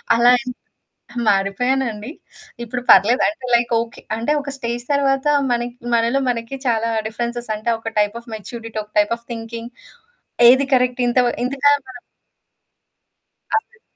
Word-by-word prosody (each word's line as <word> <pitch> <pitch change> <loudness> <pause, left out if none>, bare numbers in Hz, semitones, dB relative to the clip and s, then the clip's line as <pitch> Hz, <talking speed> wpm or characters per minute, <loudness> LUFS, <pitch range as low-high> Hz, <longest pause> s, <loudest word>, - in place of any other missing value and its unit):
అలా 240 +1 +5
అంత 250 -1 -5 0.8
మారిపోయానండి. 215 +4 0 0.5
ఇప్పుడు 245 +1 -4
పర్లేదు. 235 +6 +6
అంటే 310 -4 -7
లైక్ 235 0 +2
ఓకే. 230 +1 -7 0.2
అంటే 230 +6 0
ఒక 280 0 -6
స్టేజ్ 240 -1 -4
తర్వాత 275 -1 +1 0.2
మనకి, 240 0 -1 0.2
మనలో 235 +4 +2
మనకి 235 +2 -3
చాలా 230 -1 +1 0.2
డిఫరెన్సెస్ 235 +1 -4
అంటే 215 +2 -2
ఒక 225 0 -6
టైప్ 210 +1 +1
ఆఫ్ 235 - -15
మెచ్యూరిటీ, 225 +1 -8
ఒక 210 - -28
టైప్ 210 +2 +3
ఆఫ్ 235 - -19
థింకింగ్ 230 0 -7 0.8
ఏది 260 +3 +5
కరెక్ట్? 250 0 +1
ఇంత 240 - +1
వ - - +3 0.2
ఇంతగా 275 +3 +2 0.2
మనం 250 -1 -10 1.5
అవునండి. 460 +1 -4
235 Hz, 140 wpm, -20 LUFS, 230-255 Hz, 1.5 s, పర్లేదు